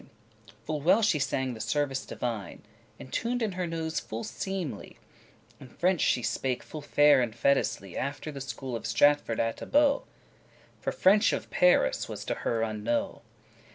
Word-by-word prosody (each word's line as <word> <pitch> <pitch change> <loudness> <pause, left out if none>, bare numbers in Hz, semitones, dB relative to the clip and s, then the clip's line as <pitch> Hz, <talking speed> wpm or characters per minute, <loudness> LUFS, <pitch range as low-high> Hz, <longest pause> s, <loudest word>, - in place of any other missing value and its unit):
*called - - -22 0.5
Full 155 -1 -3
well 180 +9 +4
she 175 -8 +3
sang 130 -2 -1
the 110 - -9
service 135 +3 -1
divine, 115 -5 -5 0.4
Entuned 235 - -2
in 215 - 0
her 180 -1 -3
nose 160 -1 -2
full 110 +1 -6
seemly; 190 - -5 0.6
And 130 - -13
French 180 -2 +1
she 125 - +2
spake 130 +1 -1
full 155 - -8
fair 145 -1 +5
and 115 -3 -2
fetisly* 120 -6 +1
*properly - - -6
After 140 +3 -4
the 140 -2 -7
school 135 -2 -5
of 115 - -4
Stratford 115 +1 +3
atte 115 0 -1
Bow, 285 -1 +4 0.7
For - - -2
French 205 +3 +4
of - - -4
Paris - - +3
was - - -6
to - - -1
her 115 -1 -2
unknow. 110 +1 -2
140 Hz, 165 wpm, -28 LUFS, 120-180 Hz, 0.7 s, fair